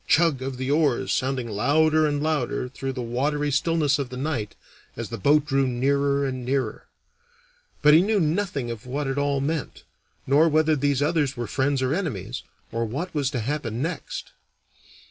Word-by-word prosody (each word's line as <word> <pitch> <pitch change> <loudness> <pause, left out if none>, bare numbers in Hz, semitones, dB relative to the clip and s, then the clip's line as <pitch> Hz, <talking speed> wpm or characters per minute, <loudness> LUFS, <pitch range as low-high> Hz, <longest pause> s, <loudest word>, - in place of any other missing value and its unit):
chug! 160 -5 +3
of 130 -1 -4
the 130 +2 -2
oars 145 -4 +2
sounding 130 -2 -1
louder 155 +8 +3
and 145 0 -1
louder 150 -5 -1
through 135 +1 -5
the 125 -2 -4
watery 145 +5 -1
stillness 150 0 +2
of 135 -3 -3
the 125 - -7
night 130 -7 -3 0.4
as 115 -2 -5
the 115 - -5
boat 145 +7 +4
drew 135 -2 +1
nearer 140 +3 +1
and 130 -2 -3
nearer. 130 -3 -2 1.0
But 150 0 +7
he 160 - +8
knew 210 +2 +2
nothing 160 -7 -1
of 115 +1 -8
what 140 +3 -2
it 135 +1 -1
all 140 -1 +1
meant, 150 +1 -3 0.4
nor 150 +5 +4
whether 155 0 +3
these 140 0 +1
others 145 -3 0
were 120 - -2
friends 135 +3 0
or 130 +2 +1
enemies, 130 - -3 0.3
or 115 - -1
what 145 +11 -4
was 145 -4 0
to 130 -5 -2
happen 125 -2 -2
next. 165 -1 -5
140 Hz, 180 wpm, -25 LUFS, 125-150 Hz, 1.0 s, he